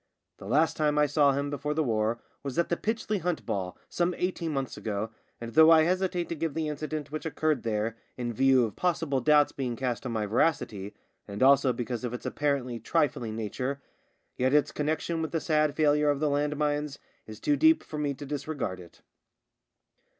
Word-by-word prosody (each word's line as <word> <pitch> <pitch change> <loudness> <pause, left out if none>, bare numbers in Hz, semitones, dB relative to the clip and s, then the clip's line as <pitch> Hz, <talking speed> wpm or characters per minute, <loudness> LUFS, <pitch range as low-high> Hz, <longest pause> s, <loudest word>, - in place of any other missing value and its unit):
The 95 - -10
last 155 +8 +3
time 150 -1 +1
I 150 - +5
saw 145 -1 +3
him 140 +1 -2
before 150 +1 -2
the 160 - +2
war 110 -2 0 0.2
was 140 0 -5
at 170 - +1
the 170 - +2
Pytchley 215 +1 -2
Hunt 175 -1 -2
ball 90 -2 -3
some 175 0 0
eighteen 180 -2 -2
months 135 -3 -3
ago, 110 0 -3 0.3
and 115 0 -7
though 160 0 +7
I 160 -1 +7
hesitate 180 0 0
to 170 - -2
give 160 -2 -3
the 160 -1 -1
incident 150 -1 -4
which 155 - -4
occurred 155 -2 0
there 110 0 -1 0.2
in 120 -1 -3
view 130 0 +4
of 110 - -6
possible 165 -6 0
doubts 150 0 +4
being 125 -3 -3
cast 125 -1 -2
on - - -3
my 110 -2 -1
veracity, 105 -4 0 0.3
and 100 +4 -2
also 135 -1 +5
because 120 0 -4
of 125 0 -3
its - - -9
apparently 135 -5 -1
trifling 120 -4 0
nature, 125 +6 -3 0.6
yet 130 +3 +2
its 150 - +3
connection 155 +2 -1
with 160 - -2
the 165 - +1
sad 155 -2 +1
failure 150 -1 +3
of 145 -1 +1
the 150 -1 +1
land 145 +1 0
mines 150 -1 -1 0.3
is 110 -1 -9
too 295 - +2
deep 320 +2 +4
for 150 - -6
me 145 -2 -1
to 145 +2 -8
dis 140 0 -5
regard 135 -12 -3
it. 85 -2 -15
145 Hz, 200 wpm, -28 LUFS, 120-155 Hz, 0.6 s, though